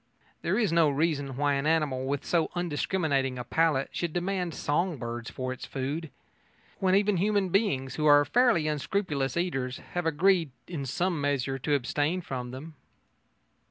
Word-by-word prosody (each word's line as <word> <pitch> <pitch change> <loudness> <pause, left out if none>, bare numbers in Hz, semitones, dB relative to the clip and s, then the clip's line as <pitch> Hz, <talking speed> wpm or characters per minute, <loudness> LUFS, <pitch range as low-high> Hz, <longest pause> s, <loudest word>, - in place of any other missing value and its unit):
There - - 0
is 220 -7 +2
no 165 -3 +5
reason 145 -3 -1
why 145 0 +2
an 140 +2 0
animal 145 -5 +1
with 140 0 -2
so 165 -2 +1
undiscriminating 150 -5 0
a 125 - -4
palate 155 -2 +1
should 170 -3 -3
demand 180 -1 -2
song 165 +3 0
birds 120 -1 -5
for 130 0 -4
its 130 - -9
food, 145 +4 -3 0.7
when 190 -1 +3
even 205 -1 +3
human 200 0 +1
beings, 140 - 0
who 155 -1 +2
are 145 0 +7
fairly 225 - +3
unscrupulous 150 -3 -1
eaters, 135 -8 -1 0.2
have 175 -1 -1
agreed 170 +1 +3 0.2
in 145 -6 -4
some 175 +3 -1
measure 135 -2 -1
to 145 +3 +1
abstain 145 +6 0
from 125 -6 -5
them. 140 +6 -8
150 Hz, 160 wpm, -28 LUFS, 135-175 Hz, 0.7 s, are